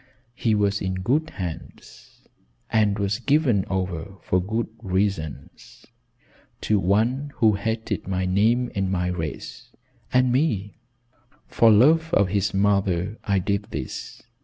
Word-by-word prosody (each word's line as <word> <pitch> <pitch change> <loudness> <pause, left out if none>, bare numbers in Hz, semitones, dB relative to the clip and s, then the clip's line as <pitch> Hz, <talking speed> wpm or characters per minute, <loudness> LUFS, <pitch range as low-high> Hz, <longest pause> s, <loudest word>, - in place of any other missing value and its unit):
He 115 -3 +1
was 100 0 +1
in 95 -1 -2
good 135 +12 0
hands 85 -4 -9 0.5
and 105 -2 +2
was 100 +2 -1
given 130 - +2
over 95 -1 -3
for 90 - +1
good 110 +5 -2
reasons, 100 - -3 0.8
to 105 -2 +1
one 115 +10 +1
who 110 -2 +4
hated 110 +3 -3
my 95 -1 -1
name 110 +7 +2
and 95 -1 -1
my 90 -1 0
race 80 -4 -6 0.4
and 125 0 +3
me. 115 -8 0 0.7
For 115 - +4
love 160 +10 +4
of 100 -2 +3
his 100 +1 0
mother 100 0 0
I 100 -2 +1
did 100 +2 -1
this. - - -7
100 Hz, 130 wpm, -24 LUFS, 95-115 Hz, 0.8 s, who